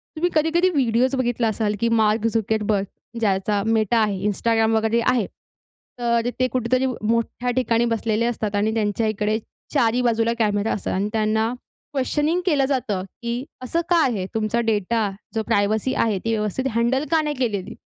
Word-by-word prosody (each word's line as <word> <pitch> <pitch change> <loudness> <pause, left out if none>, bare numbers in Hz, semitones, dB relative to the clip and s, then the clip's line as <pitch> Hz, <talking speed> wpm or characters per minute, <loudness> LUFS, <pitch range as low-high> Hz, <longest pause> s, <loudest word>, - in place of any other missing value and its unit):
तुम्ही 340 +3 +1
कधी-कधी 330 +4 +3
व्हिडिओज 255 -3 +2
बघितला 240 -2 0
असाल, 215 -1 0
की 230 - +1
मार्क 215 +1 +2
झुकरबर्ग, 215 -2 0 0.3
ज्याचा 200 -1 +1
Meta 220 +1 +1
आहे, 200 -3 -1
Instagram 225 +2 +1
वगैरे 220 +1 +1
आहे, 235 -5 +1 0.7
तर 235 0 +1
ते 255 - +3
कुठेतरी 255 +1 +1
मोठ्या 230 +1 -1
ठिकाणी 235 -2 +2
बसलेले 225 +1 0
असतात 215 -3 -2
आणि 215 +2 +1
त्यांच्या 220 0 0
इकडे 215 +1 0 0.4
चारही 235 +2 +2
बाजूला 230 -1 +2
कॅमेरा 210 -1 +1
असतात 205 - -3
आणि 200 +2 0
त्यांना 220 +1 +1 0.4
क्वेशनिंग 295 +5 0
केलं 290 -6 +3
जातं, 225 -9 -1 0.2
की 235 +2 -2 0.2
असं 330 +7 -1
का 340 -2 +5
आहे? 210 -7 -1
तुमचा 220 +2 0
डेटा, 220 -1 0 0.2
जो 220 - 0
प्रायव्हसी 215 +5 +1
आहे, 215 -4 +1
ती 225 - 0
व्यवस्थित 215 +5 -2
हँडल 240 +4 +1
का 325 -1 +4
नाही 295 -2 -2
केलेली? 210 -7 -2
225 Hz, 160 wpm, -22 LUFS, 215-250 Hz, 0.7 s, का